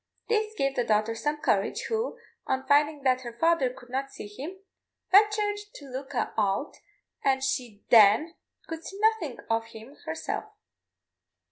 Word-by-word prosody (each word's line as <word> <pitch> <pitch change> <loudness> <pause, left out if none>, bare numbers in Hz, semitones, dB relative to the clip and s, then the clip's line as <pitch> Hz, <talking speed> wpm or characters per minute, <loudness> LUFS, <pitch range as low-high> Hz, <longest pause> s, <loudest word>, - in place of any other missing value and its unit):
This 435 -1 +1
gave 275 0 0
the 245 - +1
daughter 215 0 +1
some 295 +6 -1
courage, - - +1
who, 450 +1 -2 0.3
on 265 0 -1
finding 290 +1 +3
that 255 -1 +3
her 235 -2 -8
father 330 -4 +3
could 245 -1 -15
not 270 +1 -2
see - - -9
him, 275 - -7 0.5
ventured 415 +1 +4 0.2
to 285 - -10
look 265 +2 -6
out, 215 +3 -1 0.5
and 265 -1 +2
she 240 -6 -2
then 225 +9 +7 0.3
could 325 0 -6
see 390 - -8
nothing 430 - +1
of 225 0 +1
him 230 +5 -12
herself. 160 - -3
270 Hz, 150 wpm, -28 LUFS, 235-330 Hz, 0.5 s, then